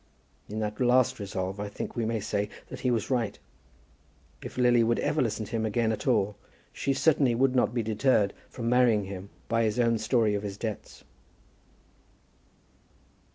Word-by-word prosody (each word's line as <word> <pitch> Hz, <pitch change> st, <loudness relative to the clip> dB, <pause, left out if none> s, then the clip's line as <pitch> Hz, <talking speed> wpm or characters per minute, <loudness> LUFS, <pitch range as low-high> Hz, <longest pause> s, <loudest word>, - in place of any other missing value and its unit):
In 105 Hz, -, -5 dB
that 105 Hz, 0 st, -3 dB
last 125 Hz, -1 st, +3 dB
resolve 95 Hz, -1 st, -4 dB
I 105 Hz, -, -3 dB
think -, -, -6 dB
we 115 Hz, -2 st, -1 dB
may 115 Hz, -1 st, -1 dB
say 105 Hz, 0 st, -2 dB, 0.2 s
that -, -, -7 dB
he 130 Hz, -, 0 dB
was 115 Hz, 0 st, -1 dB
right. 120 Hz, -5 st, 0 dB, 1.0 s
If -, -, -8 dB
Lily 120 Hz, -2 st, +4 dB
would 115 Hz, +1 st, +2 dB
ever 150 Hz, +1 st, 0 dB
listen 110 Hz, -3 st, -1 dB
to 105 Hz, -, -13 dB
him 115 Hz, -2 st, -1 dB
again 110 Hz, +1 st, +1 dB
at 110 Hz, -, -4 dB
all, 105 Hz, -4 st, +2 dB, 0.4 s
she 140 Hz, -, -1 dB
certainly 135 Hz, -3 st, +3 dB
would 130 Hz, +1 st, +2 dB
not 125 Hz, -, +3 dB
be 120 Hz, -1 st, -1 dB
deterred 110 Hz, -1 st, +2 dB, 0.2 s
from 115 Hz, -2 st, -5 dB
marrying 120 Hz, -4 st, +4 dB
him 95 Hz, 0 st, -7 dB, 0.2 s
by 115 Hz, 0 st, +1 dB
his 110 Hz, +1 st, 0 dB
own 115 Hz, -2 st, +3 dB
story 110 Hz, -1 st, +2 dB
of 100 Hz, -, -1 dB
his 100 Hz, -1 st, -5 dB
debts. 110 Hz, -2 st, -6 dB
115 Hz, 175 wpm, -28 LUFS, 105-125 Hz, 1.0 s, Lily